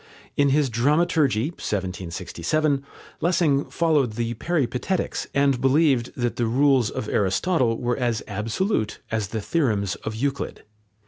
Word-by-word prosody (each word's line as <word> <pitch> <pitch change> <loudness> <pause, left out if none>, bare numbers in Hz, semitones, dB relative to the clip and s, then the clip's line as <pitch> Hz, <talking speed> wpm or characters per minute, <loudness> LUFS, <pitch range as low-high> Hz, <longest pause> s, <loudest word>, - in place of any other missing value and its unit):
In 140 -1 +3
his 145 +1 +3
Dramaturgie 145 0 +2
(1767), 95 - -2 0.4
Lessing 165 -4 +2
followed 150 -8 +1
the 115 +1 -2
Peripatetics, 155 +5 -1
and 140 -3 +2
believed 135 -2 +3
that 120 -2 -1
the 120 - +1
rules 130 -1 +3
of 110 - -5
Aristotle 115 - +1
were 120 -1 -1
as 120 -4 -1
absolute 110 - -1
as 110 -3 -1
the 110 +3 -4
theorems 105 - 0
of 110 - -5
Euclid. 140 +4 -3
125 Hz, 125 wpm, -24 LUFS, 110-150 Hz, 0.4 s, In